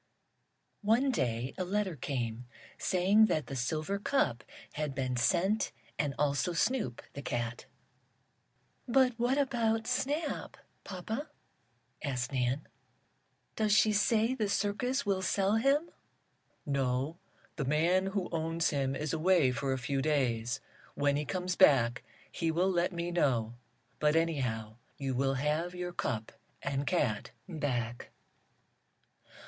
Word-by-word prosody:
One 230 Hz, +6 st, +3 dB
day 120 Hz, -, -1 dB
a -, -, +1 dB
letter 190 Hz, -1 st, -1 dB
came, 125 Hz, -3 st, -3 dB, 0.3 s
saying 195 Hz, +4 st, +4 dB
that 155 Hz, -6 st, 0 dB
the 135 Hz, -, -6 dB
silver 155 Hz, +9 st, -1 dB
cup 175 Hz, -, +1 dB, 0.3 s
had 150 Hz, -2 st, -3 dB
been 130 Hz, -2 st, -1 dB
sent, 190 Hz, -, +2 dB, 0.3 s
and 145 Hz, -2 st, 0 dB
also 145 Hz, +4 st, +1 dB
Snoop, 215 Hz, -, 0 dB
the 140 Hz, -, -6 dB
cat. 120 Hz, -3 st, -3 dB, 1.2 s
"But 255 Hz, 0 st, +4 dB
what 245 Hz, +3 st, +2 dB
about 230 Hz, -5 st, +1 dB
Snap, 295 Hz, +6 st, -2 dB, 0.3 s
papa?" 220 Hz, -, -5 dB, 0.7 s
asked 130 Hz, -3 st, -2 dB
Nan. 130 Hz, +2 st, 0 dB, 0.9 s
"Does 215 Hz, -2 st, +2 dB
she 215 Hz, 0 st, +5 dB
say 220 Hz, +3 st, +3 dB
the 215 Hz, -5 st, -1 dB
circus 245 Hz, +7 st, 0 dB
will 195 Hz, -2 st, +1 dB
sell 195 Hz, +3 st, +2 dB
him?" 280 Hz, +8 st, +2 dB, 0.7 s
"No, 135 Hz, +3 st, -1 dB, 0.4 s
the 145 Hz, -, -2 dB
man 170 Hz, +7 st, +2 dB
who 195 Hz, -2 st, -1 dB
owns 165 Hz, 0 st, 0 dB
him 135 Hz, -2 st, 0 dB
is 150 Hz, +1 st, -3 dB
away 165 Hz, -4 st, +4 dB
for 125 Hz, +2 st, -2 dB
a 130 Hz, -, +1 dB
few 135 Hz, +2 st, -1 dB
days. 130 Hz, -4 st, 0 dB, 0.3 s
When 145 Hz, 0 st, +2 dB
he 150 Hz, +1 st, -1 dB
comes 180 Hz, +2 st, -2 dB
back 125 Hz, -10 st, +5 dB, 0.3 s
he 165 Hz, -, -1 dB
will 175 Hz, +4 st, +2 dB
let 175 Hz, 0 st, +1 dB
me 170 Hz, 0 st, -3 dB
know. 120 Hz, -9 st, +1 dB, 0.5 s
But, 150 Hz, 0 st, +3 dB
anyhow, 125 Hz, -10 st, 0 dB, 0.2 s
you 135 Hz, -2 st, -2 dB
will 135 Hz, +1 st, +1 dB
have 155 Hz, +6 st, -1 dB
your 180 Hz, 0 st, -4 dB
cup 110 Hz, -9 st, -2 dB, 0.3 s
and 140 Hz, 0 st, -1 dB
cat 135 Hz, -, 0 dB, 0.2 s
back." 125 Hz, -9 st, -3 dB
160 Hz, 130 wpm, -32 LUFS, 135-200 Hz, 1.2 s, she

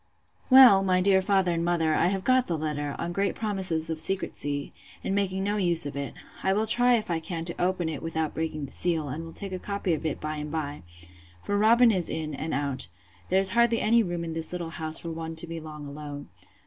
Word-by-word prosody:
Well, 255 Hz, -7 st, +8 dB
my 185 Hz, -1 st, +2 dB
dear 190 Hz, 0 st, +4 dB
father 190 Hz, -2 st, +1 dB
and 170 Hz, 0 st, -1 dB
mother, 170 Hz, -2 st, +1 dB
I 170 Hz, -, +2 dB
have 190 Hz, 0 st, -1 dB
got 255 Hz, +1 st, +3 dB
the 170 Hz, -, -1 dB
letter, 145 Hz, -2 st, -3 dB
on 170 Hz, -, -4 dB
great 200 Hz, +2 st, -1 dB
promises 190 Hz, -7 st, 0 dB
of 160 Hz, -1 st, -2 dB
secrecy, 145 Hz, -6 st, -2 dB, 0.3 s
and -, -, -2 dB
making 190 Hz, -1 st, -1 dB
no 205 Hz, +1 st, -1 dB
use 175 Hz, -4 st, +2 dB
of 145 Hz, -, -6 dB
it. 140 Hz, -3 st, -5 dB, 0.3 s
I 190 Hz, -, +1 dB
will 215 Hz, +2 st, +1 dB
try 245 Hz, +2 st, +5 dB
if 215 Hz, -6 st, -2 dB
I 165 Hz, -, 0 dB
can 165 Hz, 0 st, -5 dB
open 180 Hz, -1 st, 0 dB
it 155 Hz, -3 st, -4 dB
without 160 Hz, -1 st, -3 dB
breaking 155 Hz, -2 st, -3 dB
the 140 Hz, -, -11 dB
seal, 160 Hz, -5 st, -1 dB
and 155 Hz, +5 st, -5 dB
will 165 Hz, -, -9 dB
take 195 Hz, +3 st, -4 dB
a 185 Hz, -, -4 dB
copy 200 Hz, -3 st, -2 dB
of 155 Hz, -, -3 dB
it 155 Hz, -3 st, -2 dB
by 155 Hz, 0 st, -4 dB
and 150 Hz, 0 st, -5 dB
by; 150 Hz, -2 st, -4 dB, 0.6 s
for 205 Hz, -, -2 dB
Robin 230 Hz, +3 st, +5 dB
is 185 Hz, -5 st, -1 dB
in 155 Hz, -1 st, -4 dB
and 155 Hz, +3 st, -4 dB
out: 140 Hz, -5 st, 0 dB, 0.4 s
there 190 Hz, +1 st, +3 dB
being 190 Hz, -, +9 dB
hardly 235 Hz, -1 st, +3 dB
any 230 Hz, +2 st, +3 dB
room 175 Hz, -4 st, -3 dB
in 165 Hz, -1 st, -5 dB
this 160 Hz, 0 st, -4 dB
little 175 Hz, -2 st, -5 dB
house 160 Hz, -1 st, -5 dB
for 170 Hz, -, -7 dB
one 165 Hz, 0 st, -6 dB
to 160 Hz, -, 0 dB
be 165 Hz, 0 st, -6 dB
long 155 Hz, -2 st, -9 dB
alone. 145 Hz, -3 st, -8 dB
170 Hz, 235 wpm, -26 LUFS, 155-195 Hz, 0.6 s, being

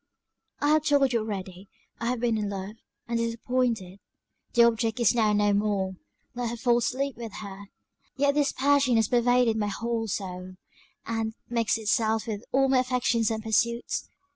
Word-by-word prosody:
"I 290 Hz, -, +2 dB
have 305 Hz, 0 st, +4 dB
told 280 Hz, -3 st, +3 dB
you 235 Hz, -, +3 dB
already 195 Hz, -3 st, -6 dB, 0.3 s
I 230 Hz, -, -2 dB
have 250 Hz, 0 st, -1 dB
been 235 Hz, -2 st, +1 dB
in 210 Hz, -2 st, -2 dB
love, 200 Hz, +2 st, -6 dB, 0.3 s
and 235 Hz, 0 st, -1 dB
disappointed 230 Hz, -4 st, -1 dB, 0.5 s
the 235 Hz, -, +6 dB
object 230 Hz, 0 st, +1 dB
is 235 Hz, -, +4 dB
now 220 Hz, -3 st, +2 dB
no 205 Hz, 0 st, +3 dB
more; 200 Hz, -2 st, 0 dB, 0.4 s
let 245 Hz, -1 st, -3 dB
her 235 Hz, -, -5 dB
faults 240 Hz, 0 st, +2 dB
sleep 275 Hz, +1 st, -2 dB
with 230 Hz, -4 st, -7 dB
her! 200 Hz, -1 st, -8 dB, 0.5 s
Yet 280 Hz, +1 st, +2 dB
this 290 Hz, -1 st, +2 dB
passion 280 Hz, -2 st, +3 dB
has 225 Hz, -2 st, +3 dB
pervaded 245 Hz, -1 st, +3 dB
my 210 Hz, -1 st, 0 dB
whole 225 Hz, +2 st, -2 dB
soul, 185 Hz, -2 st, -5 dB, 0.5 s
and 225 Hz, -1 st, -2 dB
mixed 230 Hz, -2 st, +1 dB
itself 220 Hz, 0 st, +1 dB
with 215 Hz, -2 st, -4 dB
all 270 Hz, +1 st, +3 dB
my 265 Hz, -1 st, +3 dB
affections 250 Hz, -3 st, +1 dB
and 220 Hz, -1 st, -3 dB
pursuits. 235 Hz, +2 st, 0 dB
230 Hz, 170 wpm, -27 LUFS, 210-245 Hz, 0.5 s, the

